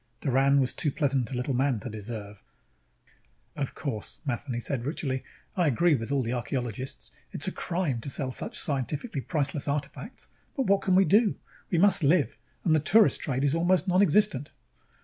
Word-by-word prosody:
Doran 140 0 +3
was 130 -2 +1
too 150 - +1
pleasant 135 -5 0
a 130 - -4
little 125 +2 -1
man 130 -2 +1
to - - -6
deserve 105 -2 -6 1.1
"Of 140 -3 -3
course," 115 -8 -4
Matheny 125 -1 -3
said 120 0 -2
ritually, 135 -2 -2 0.3
"I 180 -3 +2
agree 160 +5 +3
with 115 -1 -2
all 140 -2 +1
the 115 +1 -2
archeologists 125 0 -4 0.2
it's - - -2
a - - 0
crime 170 -9 -2
to 140 - -5
sell 135 -1 -1
such - - -3
scientifically 140 - -2
priceless 145 -1 -1
artifacts, 145 - -4 0.3
but 270 -4 0
what 200 -1 +3
can 185 - +2
we 190 +1 +6
do? 210 +2 +4 0.3
We 175 - +1
must 195 +2 +4
live, 150 0 +3 0.3
and 165 - +4
the - - +4
tourist 205 +8 +4
trade 135 -2 -1
is 140 0 +2
almost 175 +3 +2
nonexistent." 185 -4 +2
140 Hz, 175 wpm, -27 LUFS, 125-175 Hz, 1.1 s, we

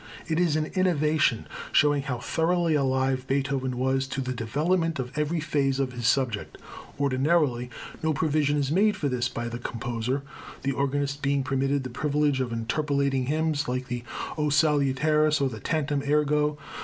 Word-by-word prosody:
It 160 0 0
is 170 -4 +2
an 155 0 +1
innovation, 155 - +2 0.3
showing 145 -1 +4
how 135 -3 -3
thoroughly 165 +6 +1
alive 130 -2 +1
Beethoven 135 -2 -1
was 130 +1 +1
to 135 - -4
the 130 -1 -2
development 160 +8 0
of 130 +1 -5
every 150 +2 0
phase 140 -3 0
of 130 -2 -1
his 120 -1 -2
subject. 115 -6 0 0.4
Ordinarily, 140 -2 +1 0.3
no 160 - +1
provision 150 -1 +1
is 140 -1 0
made 210 +5 +3
for 145 -6 -1
this 125 -1 0
by 120 -1 -4
the 120 0 -5
composer, 120 +3 -3 0.4
the 140 - +1
organist 140 +1 -1
being 140 0 +1
permitted 135 +1 0
the 130 - -6
privilege 145 0 +1
of 125 -2 -2
interpolating 135 +3 0
hymns 155 0 0
like 125 0 -3
the 120 -1 -3 0.4
O 150 0 +1
Salutaris 150 +1 +3
or 140 -1 +1
the 110 -3 -7
Tantum 145 -1 -1
ergo. 150 0 +2
140 Hz, 165 wpm, -26 LUFS, 130-150 Hz, 0.4 s, showing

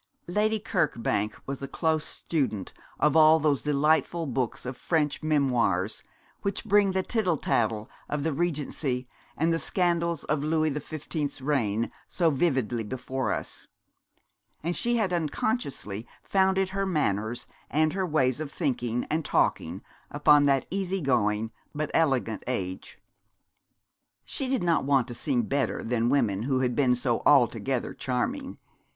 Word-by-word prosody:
Lady 210 +5 +1
Kirkbank 110 - 0
was 135 0 -5
a 135 - -4
close 160 +2 0
student 135 - -2 0.3
of 150 0 +3
all 160 0 +7
those 150 -3 +1
delightful 155 +3 +2
books 130 -4 -2
of 125 +1 -4
French 150 0 0
memoirs 125 - +1 0.4
which 200 +3 -2
bring 205 -2 +4
the 190 0 +1
tittle 185 -9 +1
tattle 110 -4 0 0.2
of 150 -1 -2
the 160 0 0
Regency 140 -5 -2 0.3
and 165 +2 +2
the 165 - +1
scandals 170 -3 0
of 150 -1 -1
Louis 155 0 +1
the 150 - -2
Fifteenth's 150 -1 -4
reign 115 -6 0 0.2
so 170 -3 +2
vividly 130 -6 0
before 130 +3 -3
us: - - -5 1.0
and 170 +2 -1
she 240 0 +1
had 200 -5 0
unconsciously 150 - -2 0.2
founded 190 -1 +2
her 195 +1 -1
manners 115 - -1 0.2
and 155 +1 +2
her 190 - -1
ways 145 -7 +1
of 155 -2 -5
thinking 125 -7 -1
and 160 +1 +1
talking 90 - 0 0.3
upon 145 0 +5
that 135 -2 +3
easy 195 0 -1
going 110 -5 +1 0.2
but 150 0 -2
elegant 135 -8 +1
age. 95 -7 -4 1.3
She 270 - -3
did 255 -6 0
not 170 -2 +2
want 135 -3 +2
to - - -4
seem 125 0 0
better 140 +5 -1
than 120 0 +1
women 110 -8 +2
who 130 +2 0
had 125 -2 0
been 125 -2 +3
so 120 -2 0
altogether 125 -2 +3
charming. 255 - -2
145 Hz, 145 wpm, -27 LUFS, 125-165 Hz, 1.3 s, all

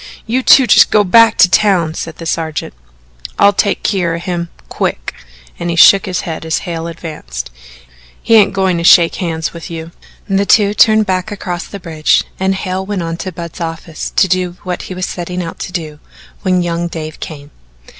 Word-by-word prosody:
"You 245 +4 0
two 265 +1 +6
just - - +6
go 210 - +3
back 230 +4 +5
to - - +7
town," 180 -5 +2
said 165 -1 -6
the 165 - -8
sergeant. 160 -1 -3 0.6
"I'll 200 0 +5
take 200 0 0
keer 180 -5 0
of 170 - -7
him. 175 -2 -3 0.2
Quick!" - - -3 0.5
and 175 - -3
he 170 - -1
shook 195 +4 +6
his 180 -2 -2
head 160 -2 -6
as 160 +3 -2
Hale 165 -2 -4
advanced. 150 - -7 0.7
"He - - 0
ain't 215 -3 +6
goin' 190 -2 0
to - - -3
shake 170 -1 +5
hands 160 -3 -3
with 170 -1 -9
you." 165 0 -7 0.4
The 195 0 0
two 205 -2 +4
turned 215 0 +4
back 185 +1 -2
across 180 -3 -5
the 200 - -8
bridge 160 -3 +1 0.2
and 190 0 0
Hale 190 0 -3
went 195 -2 -3
on 165 0 -3
to 185 - -5
Budd's 170 0 -8
office 165 -1 -5
to 195 - +4
do 180 -1 -1
what 180 -2 -4
he 185 - -6
was 185 0 -3
setting 180 0 -5
out 165 - -8
to - - -6
do 155 -4 -6 0.4
when 185 -2 +1
young 170 0 -2
Dave 155 -2 -7
came. 145 -2 -9
175 Hz, 195 wpm, -14 LUFS, 165-195 Hz, 0.7 s, to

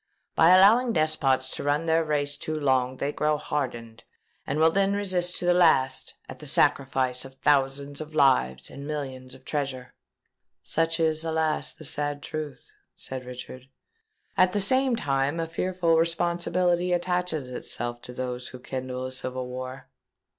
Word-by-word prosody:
By 165 - +5
allowing 215 +7 +6
despots 145 -5 +2
to - - -5
run 145 +3 +1
their 165 0 +3
race 145 -2 0
too 155 +2 -4
long, 130 -2 +1
they 140 +2 -1
grow 150 0 +1
hardened 120 -6 -4 0.4
and 140 - -1
will 160 +1 +5
then 195 +2 +2
resist 185 -3 -1
to - - -3
the 175 - +5
last, 160 -7 +2
at - - -10
the - - -8
sacrifice 130 -2 +2
of 135 0 -12
thousands 140 +1 +1
of 155 0 -9
lives 65 - +3
and 140 +1 -8
millions 130 -4 -5
of 130 0 -18
treasure." 135 -4 -3 0.7
"Such 165 +1 +1
is, 160 -1 +1
alas! 160 -1 0
the 155 - -12
sad 145 0 -3
truth," 150 -4 -6 0.2
said 130 -1 -7
Richard. 125 +1 -9 0.7
"At 185 0 +4
the 205 - +1
same 260 +5 +2
time 140 -4 0
a 165 - -1
fearful 170 0 0
responsibility 175 +2 +1
attaches 175 -6 -1
itself 120 -1 -4
to - - -9
those 125 0 -4
who 125 - -10
kindle 130 0 -5
a 130 - -5
civil 130 0 -4
war." 130 +1 -7
145 Hz, 160 wpm, -26 LUFS, 130-165 Hz, 0.7 s, allowing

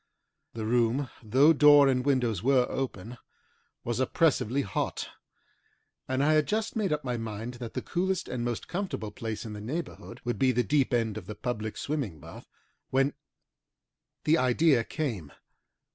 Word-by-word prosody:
The 110 -1 -3
room, 120 +3 +1
though 130 +8 +5
door 145 -1 +7
and 130 -1 +2
windows 125 -8 +1
were 130 +1 +4
open, 120 -3 -4 0.6
was 120 0 -2
oppressively 140 -2 +2
hot, 95 - -3 1.0
and 130 +1 0
I 155 +2 +4
had 155 -1 +3
just 220 +2 -1
made 210 -6 0
up 150 0 -1
my 125 -2 -2
mind 115 +1 -5
that 115 - -6
the - - -3
coolest 185 +1 -1
and 120 - -3
most 120 -1 -3
comfortable 180 - -4
place 110 +1 -5
in 110 - -6
the 105 - -7
neighbourhood 155 +11 -6
would 120 -1 -2
be 130 -1 +4
the 125 +1 +2
deep 145 -1 +1
end 115 -3 0
of - - -15
the 105 - -6
public 110 -1 -4
swimming 135 - -3
bath, - - -12 0.4
when 135 +2 +2 1.1
the 160 +2 +3
idea 130 0 +3
came. 110 - -4
125 Hz, 160 wpm, -28 LUFS, 115-145 Hz, 1.1 s, door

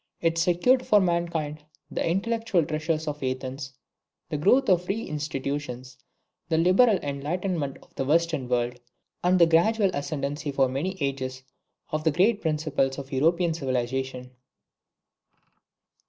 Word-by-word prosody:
It 165 0 +1
secured 180 +10 +3
for 210 - +5
mankind 170 -4 -1 0.3
the - - -1
intellectual 195 0 0
treasures 155 +1 -2
of 150 0 -4
Athens, 130 +1 -4 0.6
the 150 - -2
growth 205 - +4
of 180 -3 +4
free 210 +5 -2
institutions 140 -3 -4 0.5
the 160 - +2
liberal 190 +6 +5
enlightenment 145 +1 -2
of - - -25
the - - -2
Western 155 -2 +1
world, 120 0 0 0.4
and 180 +1 +4
the 170 - +7
gradual 195 +5 +3
ascendency 145 0 -3
for 135 -1 +2
many 155 +9 -3
ages 130 -2 -3 0.5
of 155 0 -1
the 160 - +4
great 200 +7 +2
principles 150 -4 0
of 140 -1 -8
European 165 +5 +2
civilisation. 130 -2 -3
155 Hz, 130 wpm, -26 LUFS, 135-175 Hz, 0.6 s, the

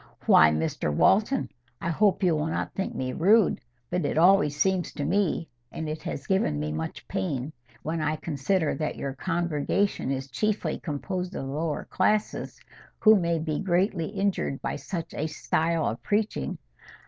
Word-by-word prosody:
"Why, 80 - +7
Mr 75 -1 -1
Walton—I 170 - +1
hope 195 +3 +2
you 175 -3 +4
will 150 +1 -1
not 160 - -3
think 190 - -3
me 130 -1 -2
rude, 205 +4 +4 0.3
but 180 0 0
it - - -1
always 170 -4 +5
seems 185 +2 +1
to 145 - -3
me—and 160 -8 -2
it 155 +1 -4
has 140 - -5
given 165 - +1
me 75 +1 -2
much 80 +1 -5
pain, 130 +9 -3 0.3
when 160 +1 -2
I 155 0 0
consider 155 +2 0
that 155 -1 -2
your 135 -1 -4
congregation 170 +2 -1
is 135 0 -3
chiefly 215 +8 -1
composed 180 +4 -4
of - - -4
the 135 - -5
lower 155 0 -2
classes, 210 +3 0 0.4
who 220 -1 +7
may 170 -4 +1
be 155 -1 -2
greatly 180 -2 +1
injured 195 -8 -1
by - - -3
such 170 -4 -5
a 155 - -2
style 160 +1 0
of 115 - -2
preaching. 205 - -1
160 Hz, 160 wpm, -27 LUFS, 140-190 Hz, 0.4 s, Why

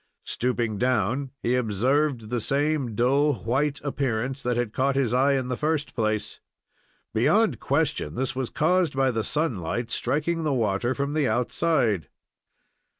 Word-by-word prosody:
Stooping 120 -4 -1
down, 125 +2 +1
he 120 - +1
observed 125 +2 0
the 120 -2 0
same 140 -3 0
dull, 140 +5 +3
white 140 +5 0
appearance 135 -2 -2
that 120 -1 -1
had 120 -3 -1
caught 135 +1 +1
his 130 -4 +1
eye 135 +3 +4
in 130 -2 -1
the 125 - -1
first 150 +2 -1
place. 110 -2 -2 0.7
Beyond - - +3
question 75 - -1
this 130 0 -2
was 130 -2 -2
caused 175 -1 +1
by 135 -1 +2
the 110 -2 -1
sunlight 120 - -2
striking 155 +6 0
the 150 -2 +1
water 115 +2 0
from 140 +1 -2
the 150 -3 +1
outside. 120 - +1
130 Hz, 150 wpm, -25 LUFS, 115-145 Hz, 0.7 s, eye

